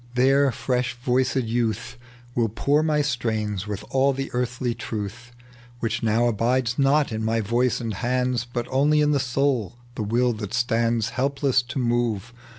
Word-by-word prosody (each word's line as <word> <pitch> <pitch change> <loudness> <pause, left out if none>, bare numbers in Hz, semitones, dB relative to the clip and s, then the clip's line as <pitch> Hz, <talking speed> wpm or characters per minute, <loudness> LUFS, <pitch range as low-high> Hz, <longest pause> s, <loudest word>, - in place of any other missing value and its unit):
There 135 +2 +4
fresh 125 +1 -1
voiced 125 +1 +1
youth 115 -2 -1 0.4
Will 115 -2 +1
pour 140 +7 +1
my 155 -1 +2
strains 110 -7 -2
with 105 0 -5
all 135 +1 +3
the 135 +1 -4
early 125 0 -1
truth 115 +2 -6 0.5
Which 115 0 -2
now 115 +1 +2
abid^ 120 +3 0
not 140 +1 +3
in 110 0 -3
my 115 +1 +1
voice 120 +4 +1
and 115 -3 -3
hands, 125 +1 -1
But 120 -1 -3
only 145 +3 +3
in 150 0 +3
the 145 - +2
soul, 130 -4 0 0.2
the 120 - -5
will 120 +4 +1
that 105 -3 -5
stands 115 -1 +1
Helpless 135 +2 +1
to 125 +3 -7
move. 120 -3 0
120 Hz, 160 wpm, -24 LUFS, 115-130 Hz, 0.5 s, There